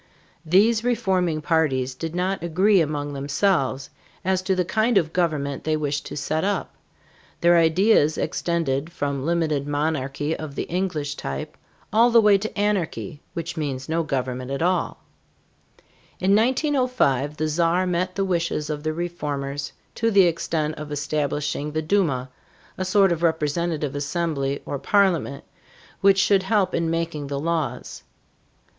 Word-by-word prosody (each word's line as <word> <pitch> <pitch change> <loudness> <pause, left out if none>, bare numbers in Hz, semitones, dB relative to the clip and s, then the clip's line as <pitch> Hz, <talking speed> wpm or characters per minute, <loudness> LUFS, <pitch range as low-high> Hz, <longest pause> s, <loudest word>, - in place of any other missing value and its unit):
These 215 +7 +3
reforming 190 -10 0
parties 135 -6 +1
did 165 +5 -5
not 185 +1 -1
agree 185 +4 +3
among 145 -2 -2
themselves 140 -1 0 0.3
as 190 0 +1
to 190 0 0
the 180 -1 0
kind 220 +4 +2
of 165 -4 +1
government 150 -6 -1
they 155 0 0
wished 145 -1 -2
to - - -7
set 155 +3 -1
up; 200 +1 -1 0.7
their 175 0 +5
ideas 165 -1 +4
extended 165 -3 -1
from 140 -4 -3
limited 155 -4 0
monarchy 145 0 -1
of 155 -3 -7
the - - -2
English 165 -5 -2
type, 70 0 -5 0.4
all 230 +3 +5
the 235 -1 +6
way 210 -2 +5
to 215 +2 -5
anarchy, 185 -6 -1
which 165 -1 -4
means 135 -4 -3
no 165 +1 0
government 130 -4 -3
at 140 +3 -2
all. 180 +1 0 1.2
In 195 +2 +3
1905 250 - +1
the 155 - 0
Czar 170 +3 +1
met 180 +1 -1
the 195 - 0
wishes 170 -4 -1
of 150 -1 -4
the 155 +1 -2
reformers 145 -5 -4 0.2
to 230 - 0
the 200 -3 +6
extent 160 -3 -1
of 150 -1 -7
establishing 145 0 -2
the 155 - 0
Duma, 150 -8 0 0.4
a 185 - -3
sort 195 0 +4
of 170 -1 -1
representative 160 -2 0
assembly 140 -2 -2
or 140 - -4
parliament, 185 -8 +1 0.6
which 195 0 +5
should 195 0 +4
help 190 -1 +1
in 165 -1 0
making 165 -3 -2
the 140 0 -3
laws. 155 -5 -3
160 Hz, 150 wpm, -23 LUFS, 145-185 Hz, 1.2 s, the